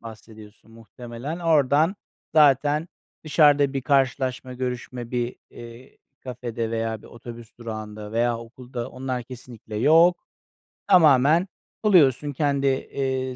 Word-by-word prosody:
bahsediyorsun 110 -1 -13
muhtemelen. 120 +6 -8
Oradan 155 0 +2 0.4
zaten 150 +2 +3 0.4
dışarıda 145 -2 +4
bir 135 -2 -3
karşılaşma, 130 -1 0
görüşme, 125 -1 -5
bir 120 -1 -3
iii, 120 +2 -13 0.3
kafede 120 -2 -5
veya 115 -1 -3
bir - - -14
otobüs 120 -1 -12
durağında 110 -2 -8
veya 120 0 0
okulda. 120 +1 -8
Onlar 130 -1 -4
kesinlikle 120 -3 -10
yok. 165 - +4 0.6
Tamamen 160 -1 +5 0.4
buluyorsun 145 - +4
kendi, 140 -1 0
iii, 130 -1 -2
130 Hz, 110 wpm, -23 LUFS, 115-145 Hz, 0.6 s, Tamamen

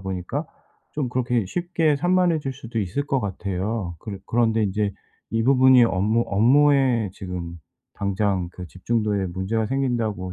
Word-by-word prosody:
보니까 95 -2 -4 0.5
좀 145 -5 -2
그렇게 125 -4 0
쉽게 165 - 0
산만해질 170 -4 +1
수도 115 -3 -6
있을 105 +10 -2
것 135 -2 0
같아요. 95 -1 -3
그래 100 -3 -7
그런데 115 -1 +2
인제 100 +1 -1 0.4
이 115 0 0
부분이 130 -1 +6
업무 105 +4 +1
업무에 130 +1 +3
지금 85 -2 -6 0.4
당장 100 -2 -1
그 90 -1 -8
집중도에 105 0 -1
문제가 95 +5 -2
생긴다고 115 -8 -1
110 Hz, 310 characters per minute, -23 LUFS, 95-130 Hz, 0.5 s, 부분이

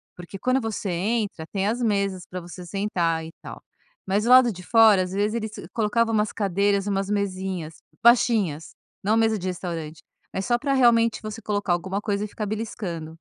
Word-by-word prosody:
porque 180 +2 -9
quando 255 +4 +2
você 220 -3 -3
entra, 200 -1 -1
tem 195 +2 -1
as 235 +3 -1
mesas 200 -4 0
pra 180 0 -6
você 175 +1 -10
sentar 175 -4 -1
e 160 - -8
tal. - - -10 0.4
Mas 200 +3 0
o 240 - 0
lado 255 -2 +7
de 180 -1 -10
fora, 215 -2 +5
às 180 - -6
vezes, 205 +3 0
eles 220 -2 -3 0.2
colocava 225 +1 +1
umas 210 -1 +1
cadeiras, 200 0 0
umas 195 -1 -1
mesinhas, 190 -5 -3 0.3
baixinhas, 220 - +3 0.3
não 215 +3 +2
mesa 225 -1 +2
de 185 - -7
restaurante, 165 -4 -5 0.3
é 190 - -1
só 240 +4 +1
para, 275 +2 -1
realmente, 230 -3 +4
você 215 +1 -6
colocar 205 -3 0
alguma 190 +3 -2
coisa 205 -1 -1
e - - -6
ficar 210 +1 -5
beliscando. 190 -7 -5
200 Hz, 185 wpm, -24 LUFS, 180-225 Hz, 0.4 s, lado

